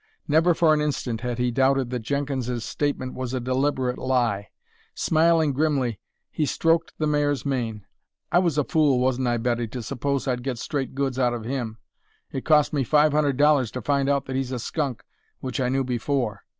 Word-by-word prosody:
Never 165 Hz, +3 st, +4 dB
for 160 Hz, -2 st, +4 dB
an 150 Hz, -, +1 dB
instant 130 Hz, -6 st, -2 dB
had 120 Hz, -1 st, -3 dB
he 125 Hz, 0 st, 0 dB
doubted 135 Hz, 0 st, +2 dB
that 125 Hz, -, -1 dB
Jenkins's 125 Hz, -1 st, -2 dB
statement 140 Hz, -3 st, -2 dB
was 130 Hz, 0 st, -4 dB
a -, -, 0 dB
deliberate 130 Hz, 0 st, 0 dB
lie. 120 Hz, -6 st, 0 dB, 0.5 s
Smiling 160 Hz, -2 st, +3 dB
grimly, 135 Hz, -6 st, 0 dB, 0.3 s
he 155 Hz, -, -1 dB
stroked 165 Hz, +2 st, +1 dB
the 155 Hz, -, 0 dB
mare's 145 Hz, -2 st, +1 dB
mane. 115 Hz, -7 st, -2 dB, 0.5 s
"I 175 Hz, -, +5 dB
was 170 Hz, -5 st, +1 dB
a 150 Hz, -, +3 dB
fool, 150 Hz, -4 st, +2 dB
wasn't 130 Hz, 0 st, +1 dB
I, 120 Hz, 0 st, +1 dB
Betty, 120 Hz, 0 st, -1 dB
to 120 Hz, +2 st, -6 dB
suppose 140 Hz, +3 st, -2 dB
I'd 125 Hz, -1 st, 0 dB
get 130 Hz, -1 st, -3 dB
straight 135 Hz, +1 st, -3 dB
goods 135 Hz, -2 st, -1 dB
out 120 Hz, -2 st, +2 dB
of 115 Hz, -2 st, -6 dB
him. 120 Hz, -3 st, -3 dB, 0.5 s
It 135 Hz, -, -5 dB
cost 150 Hz, -2 st, +4 dB
me 140 Hz, -2 st, +1 dB
five 150 Hz, +4 st, +4 dB
hundred 145 Hz, -3 st, +1 dB
dollars 145 Hz, -4 st, +4 dB
to 125 Hz, -, -4 dB
find 140 Hz, +1 st, +1 dB
out 140 Hz, -1 st, +1 dB
that 130 Hz, -, -5 dB
he's 130 Hz, -1 st, -2 dB
a 130 Hz, -, -2 dB
skunk, 135 Hz, +1 st, -3 dB, 0.4 s
which 130 Hz, +1 st, -4 dB
I 125 Hz, -, +1 dB
knew 135 Hz, +1 st, +1 dB
before. 125 Hz, -3 st, -2 dB
135 Hz, 195 wpm, -24 LUFS, 125-145 Hz, 0.5 s, I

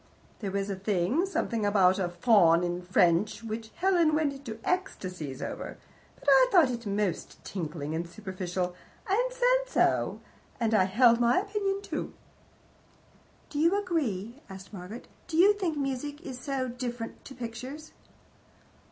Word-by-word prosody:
There 205 Hz, -, -3 dB
was 200 Hz, +1 st, -2 dB
a -, -, -2 dB
thing 200 Hz, -, 0 dB
something 230 Hz, -, -1 dB
about 195 Hz, -2 st, +4 dB
a 180 Hz, -2 st, 0 dB
faun 175 Hz, -3 st, +4 dB
in 175 Hz, 0 st, -2 dB
French 180 Hz, +4 st, +2 dB
which 220 Hz, 0 st, -5 dB
Helen 345 Hz, -4 st, +3 dB
went 305 Hz, -2 st, +1 dB
into 270 Hz, -5 st, -8 dB
ecstasies 180 Hz, -, -3 dB
over, -, -, -6 dB, 0.4 s
but -, -, -17 dB
I -, -, +7 dB
thought 330 Hz, -9 st, +6 dB
it 235 Hz, -2 st, -5 dB
most 200 Hz, -3 st, -2 dB
tinkling 155 Hz, -4 st, -4 dB
and 170 Hz, +1 st, -3 dB
superficial, 185 Hz, -2 st, -4 dB, 0.3 s
and 475 Hz, +6 st, +1 dB
said -, -, +2 dB
so, -, -, +1 dB, 0.4 s
and 225 Hz, -2 st, +1 dB
I 190 Hz, -4 st, +5 dB
held 230 Hz, +5 st, +5 dB
to -, -, -3 dB
my 240 Hz, +1 st, +4 dB
opinion 400 Hz, 0 st, -1 dB
too." -, -, -4 dB, 1.4 s
"Do 290 Hz, -, -3 dB
you 335 Hz, +6 st, +4 dB
agree?" 270 Hz, -, -2 dB
asked 190 Hz, +2 st, -10 dB
Margaret. 200 Hz, +5 st, -8 dB, 0.2 s
"Do 320 Hz, -, -3 dB
you 390 Hz, +4 st, +7 dB
think 365 Hz, -7 st, -2 dB
music 285 Hz, +1 st, -3 dB
is 255 Hz, -2 st, -7 dB
so 265 Hz, 0 st, -2 dB
different 240 Hz, -2 st, -5 dB
to 270 Hz, -, -10 dB
pictures?" 255 Hz, +6 st, -7 dB
235 Hz, 150 wpm, -29 LUFS, 190-310 Hz, 1.4 s, I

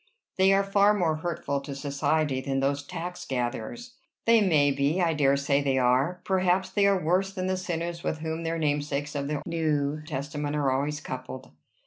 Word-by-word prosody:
"They 190 Hz, +1 st, +6 dB
are 195 Hz, 0 st, +4 dB
far 200 Hz, +1 st, +4 dB
more 165 Hz, -6 st, +1 dB
hurtful 155 Hz, -4 st, -3 dB
to 140 Hz, 0 st, -7 dB
society 140 Hz, 0 st, 0 dB
than 135 Hz, 0 st, -1 dB
those 140 Hz, +1 st, 0 dB
tax 175 Hz, +5 st, -6 dB
gatherers." 135 Hz, -, -4 dB, 0.3 s
"They 230 Hz, -1 st, +5 dB
may 150 Hz, -7 st, +4 dB
be. 140 Hz, +5 st, +1 dB
I 170 Hz, -3 st, +2 dB
dare 140 Hz, -2 st, +3 dB
say 140 Hz, 0 st, +1 dB
they 135 Hz, -2 st, +1 dB
are. 130 Hz, +8 st, +2 dB
Perhaps 185 Hz, 0 st, +1 dB
they 200 Hz, 0 st, +3 dB
are 200 Hz, -1 st, +3 dB
worse 180 Hz, +4 st, +1 dB
than 185 Hz, -2 st, -4 dB
the 185 Hz, 0 st, 0 dB
sinners 170 Hz, -2 st, -4 dB
with 155 Hz, -, -1 dB
whom 160 Hz, 0 st, -3 dB
their 165 Hz, 0 st, -1 dB
namesakes 145 Hz, -1 st, -1 dB
of 140 Hz, -1 st, -2 dB
the 150 Hz, 0 st, -3 dB
New 155 Hz, -3 st, 0 dB
Testament 145 Hz, 0 st, -3 dB
are 140 Hz, -3 st, +1 dB
always 145 Hz, +3 st, -1 dB
coupled." 130 Hz, 0 st, -7 dB
150 Hz, 185 wpm, -27 LUFS, 140-180 Hz, 0.3 s, They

